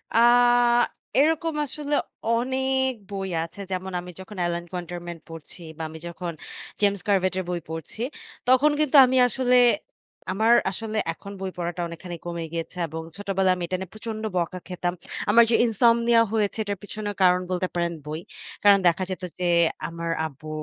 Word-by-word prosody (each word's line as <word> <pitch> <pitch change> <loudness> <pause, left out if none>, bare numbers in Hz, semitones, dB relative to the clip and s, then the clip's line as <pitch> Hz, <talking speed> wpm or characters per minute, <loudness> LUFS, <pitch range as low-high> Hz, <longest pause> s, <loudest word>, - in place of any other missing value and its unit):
আ - - +6 1.0
এরকম 320 +2 +2
আসলে 295 +1 -2 0.3
অনেক 265 +3 +1 0.2
বই 195 -1 -4 0.2
আছে। 165 +4 -10
যেমন 185 0 -3
আমি 180 0 -8
যখন 190 +2 -10
LN 170 0 -4
Quarterman 175 -1 -6
পড়ছি 165 +2 -11 0.2
বা - - -6
আমি 160 - -9
যখন 170 0 -5 0.5
James 200 -2 +2
Corvette 185 -2 +2
এর 185 - -2
বই 175 -1 -1
পড়ছি, 160 +7 -7 0.5
তখন 260 +4 +5
কিন্তু 305 -2 +1
আমি 255 +1 +1
আসলে 250 +1 +1 0.8
আমার 220 +5 +4 0.2
আসলে 220 +2 -4 0.2
এখন 200 +4 -11
বই 190 -1 -4
পড়াটা 175 0 -3
অনেকখানি 170 +1 -7
কমে 170 -1 -4
গিয়েছে। 165 +1 -5
এবং 160 +1 -5 0.2
ছোটবেলায় 195 -2 +1
আমি 180 - -5
এটা 185 - -1
নিয়ে 190 -2 -7
প্রচন্ড 215 0 -6 0.2
বকা 180 +1 -1
খেতাম। 175 -1 -2 0.4
আমার 230 +3 +7
যে - - +5
ইনসমনিয়া 235 +1 +4
হয়েছে 210 -2 0
এটার 205 -1 -3
পিছনে 210 0 -5
কারণ 180 0 +5
বলতে 185 0 0
পারেন 170 -1 0
বই। 155 +1 -4 0.4
কারণ 200 -1 +8
দেখা 175 +2 +2
যেত 185 0 -5 0.2
যে 180 - -1 0.4
আমার 170 0 -4
আব্বু 155 0 -9
190 Hz, 165 wpm, -25 LUFS, 175-230 Hz, 1.0 s, কারণ